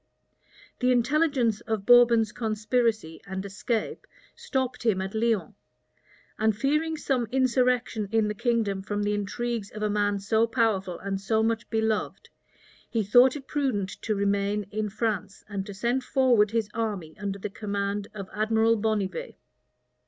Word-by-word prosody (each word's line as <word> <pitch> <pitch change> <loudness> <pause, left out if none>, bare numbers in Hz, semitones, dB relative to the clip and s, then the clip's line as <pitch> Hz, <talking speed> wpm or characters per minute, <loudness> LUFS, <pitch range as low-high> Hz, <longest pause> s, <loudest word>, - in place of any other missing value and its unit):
The 250 0 +3
intelligence 250 -3 +2
of 220 -3 -2
Bourbon's 235 -2 +6
conspiracy 220 -5 -1
and 190 +1 -4
escape 210 +3 -3 0.3
stopped 265 - -2
him 220 -5 +2
at 190 +1 -4
Lyons; 225 -2 0 0.9
and 220 -1 +2
fearing 305 +5 0
some 260 -5 0
insurrection 250 -4 +1
in 225 -1 +2
the 210 - -1
kingdom 225 -4 0
from 205 +1 -3
the 205 0 0
intrigues 210 +1 -3
of 215 0 -6
a 210 - +1
man 205 -1 +1
so 220 +3 +2
powerful 215 -7 0
and 195 -1 -4
so 220 +2 +1
much 225 -1 -1
beloved, 220 -1 -1 0.6
he 225 -2 0
thought 245 +6 +5
it 280 -2 -7
prudent 255 -11 -1
to 215 - -1
remain 200 +1 0
in 215 0 -2
France 210 -2 -3
and 200 -2 -4
to 200 - -6
send 240 +5 0
forward 245 -6 +3
his 225 -1 0
army 205 -8 -3
under 200 -1 -3
the 200 +1 -6
command 200 0 -3
of 195 -2 -6
Admiral 220 +2 +2
Bonnivet. 215 - -2
220 Hz, 150 wpm, -27 LUFS, 205-240 Hz, 0.9 s, Bourbon's